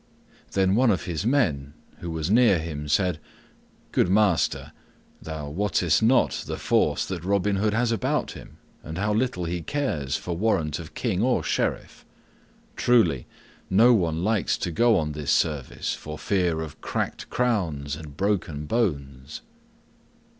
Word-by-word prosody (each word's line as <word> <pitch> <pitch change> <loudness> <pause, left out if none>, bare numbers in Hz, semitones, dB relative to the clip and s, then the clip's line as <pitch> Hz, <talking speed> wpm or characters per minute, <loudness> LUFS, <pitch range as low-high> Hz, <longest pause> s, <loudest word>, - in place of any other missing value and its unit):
Then 95 -1 +2
one 125 +3 +4
of 90 -8 +1
his 90 +4 -2
men 75 - +1 0.3
who 85 - -6
was 80 +2 -2
near 115 -4 +5
him 80 -2 -5
said, 90 +1 +1 0.7
"Good - - +2
master, 100 -4 +2 0.5
thou 80 -2 -6
wottest 90 -2 +1
not 120 +4 +3
the - - -4
force - - +1
that 90 -3 -5
Robin 100 +1 +1
Hood 105 +2 +1
has 120 0 +1
about 115 -5 -1
him - - -12 0.2
and 80 +2 -7
how 105 +3 0
little 110 -6 -1
he 85 +1 -3
cares 80 - -2
for 85 - -4
warrant 85 -6 0
of 80 -3 -10
king 105 -6 -1
or 125 +2 +2
sheriff. - - -2 0.7
Truly, 115 - +2 0.4
no 115 +6 +6
one 85 -6 0
likes 110 0 +1
to 90 - -3
go 115 +5 +3
on 75 -3 -1
this 75 -1 -5
service, 75 -6 0
for 75 0 -7
fear 85 0 0
of 80 -2 -8
cracked - - -3
crowns 85 - -1
and 75 -2 -11
broken 90 -7 -1
bones." 70 - -2
90 Hz, 150 wpm, -25 LUFS, 75-110 Hz, 0.7 s, no